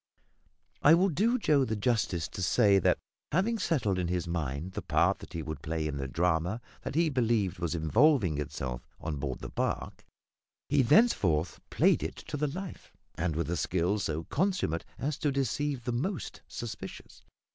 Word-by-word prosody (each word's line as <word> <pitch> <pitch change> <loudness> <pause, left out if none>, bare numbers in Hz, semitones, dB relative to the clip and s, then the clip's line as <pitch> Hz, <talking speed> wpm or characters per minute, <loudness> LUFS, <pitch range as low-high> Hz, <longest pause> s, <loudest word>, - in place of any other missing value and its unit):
I 155 +3 +8
will 190 +3 +3
do 220 - +2
Joe 150 - +3
the 110 -4 -1
justice 100 - 0
to - - -6
say 100 +3 +4
that, - - +3 0.3
having 215 +8 +1
settled 110 - +1
in 90 - 0
his 90 -1 -1
mind 80 0 -3
the - - -4
part - - +2
that - - -12
he 80 - -3
would 80 -3 -6
play 80 0 -2
in 75 -2 -2
the 70 -1 -3
drama 85 - 0 0.2
that - - -5
he 165 +1 +4
believed 115 - +1
was 85 -1 -1
evolving 95 - +3
itself 65 -4 -4 0.2
on 75 -3 -4
board 70 -2 -4
the - - -6
barque, - - -3 0.7
he 145 -1 +4
thenceforth 115 - +3
played - - +3
it - - -3
to 155 - -7
the 150 +1 0
life, 180 +5 -7 0.2
and 80 -2 -1
with 85 +1 -1
a - - +1
skill 90 +6 0
so 80 -4 -2
consummate 180 - 0
as 145 +2 -2
to 145 - +1
deceive 140 0 -1
the 125 - -2
most 155 +10 -3
suspicious. 105 -5 -8
100 Hz, 180 wpm, -30 LUFS, -, 0.7 s, I